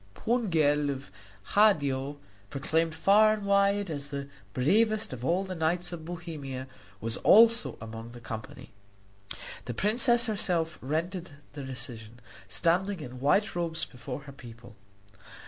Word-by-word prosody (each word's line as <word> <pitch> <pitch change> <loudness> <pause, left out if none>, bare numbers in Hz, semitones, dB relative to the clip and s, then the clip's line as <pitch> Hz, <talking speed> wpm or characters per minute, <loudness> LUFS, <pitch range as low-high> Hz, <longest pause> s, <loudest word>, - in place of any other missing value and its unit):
Pungel 160 -11 +1
of 135 -1 -5 0.4
Hadio, 145 -9 +3 0.3
proclaimed 160 +3 0
far 210 +6 +5
and 210 -2 -4
wide 200 -1 +2
as 140 -2 -4
the 140 -1 -5 0.2
bravest 215 - +2
of 125 -1 -7
all 175 +7 +1
the 190 -1 -5
knights 175 +1 -1
of 160 -2 -7
Bohemia, 150 -7 -6 0.3
was 115 +2 -2
also 230 +2 +5
among 115 +1 -8
the 120 0 -11
company. 115 -2 -8 0.9
The 120 - -5
princess 235 - +3
herself 175 -7 0
rendered 170 +6 -2 0.2
the 145 -1 -7
decision, 120 -3 -7 0.3
standing 185 +3 +1
in 125 -3 -8
white 195 +10 +2
robes 170 -1 -1
before 125 +2 -7
her 140 - -11
people. 115 -3 -13
160 Hz, 130 wpm, -29 LUFS, 130-195 Hz, 0.9 s, far